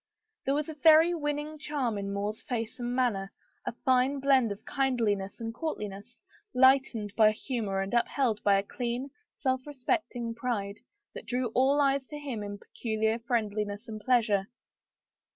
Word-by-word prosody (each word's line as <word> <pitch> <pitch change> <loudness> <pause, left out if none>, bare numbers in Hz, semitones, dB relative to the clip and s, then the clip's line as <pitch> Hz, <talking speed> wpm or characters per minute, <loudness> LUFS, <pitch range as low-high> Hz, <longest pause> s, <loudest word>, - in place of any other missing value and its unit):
There 275 - +2
was 300 0 -1
a 315 - -5
very 320 +3 +6
winning 295 -1 -3
charm 280 -6 -1
in 200 0 -3
More's 205 +2 -3
face 230 -1 -4
and 240 0 -2
manner, 210 -7 0 0.4
a - - +1
fine 260 +2 +3
blend 265 -5 +3
of 200 +2 -7
kind 265 -2 0
liness 205 -2 -1
and 225 -1 -4
courtliness, 210 -9 -5 0.4
lightened 255 -5 +4
by 215 -1 +6
humor 215 -3 -2
and 195 +3 -4
upheld 235 -2 +1
by 200 -1 +4
a 195 - 0
clean, 245 +5 -3 0.2
self 260 0 -1
respecting 260 -4 -2
pride, 225 -4 -3 0.3
that - - -9
drew 250 -1 0
all 270 +3 +4
eyes 275 -1 +3
to 295 - -8
him 270 -7 -5
in 205 0 -5
peculiar 220 +1 -1
friendliness 215 -2 -2
and 215 -1 -6
pleasure. 215 -5 +2
240 Hz, 160 wpm, -29 LUFS, 210-270 Hz, 0.4 s, very